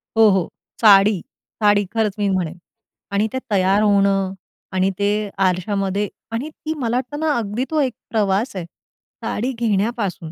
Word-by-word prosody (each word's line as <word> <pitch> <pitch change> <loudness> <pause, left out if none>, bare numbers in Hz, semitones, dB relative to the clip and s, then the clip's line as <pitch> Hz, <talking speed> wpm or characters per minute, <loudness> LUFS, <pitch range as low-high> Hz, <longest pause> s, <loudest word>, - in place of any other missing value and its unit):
हो, 225 -1 +7
हो. 190 -3 +2 0.3
साडी, 200 -2 +6 0.4
साडी 205 -1 +4
खरंच 220 -3 +1
मी 205 - +1
म्हणेन 180 -3 -1 0.5
आणि 205 +2 +1
ते - - -1
तयार 195 +1 +3
होणं 195 -2 +3 0.4
आणि 185 +1 +3
ते 200 0 +2 0.4
आरशामध्ये 195 +2 -1 0.2
आणि 245 +7 -3
ती 315 +1 -5
मला 245 -2 0
तर 290 - -4
ना 310 -1 +1
अगदी 225 +3 -2
तो 310 - +1
एक 260 -4 0 0.2
प्रवास 205 +1 0
आहे. 180 -3 -4 0.6
साडी 245 +5 -1
घेण्यापासून, 215 -6 -1
205 Hz, 150 wpm, -21 LUFS, 195-230 Hz, 0.6 s, हो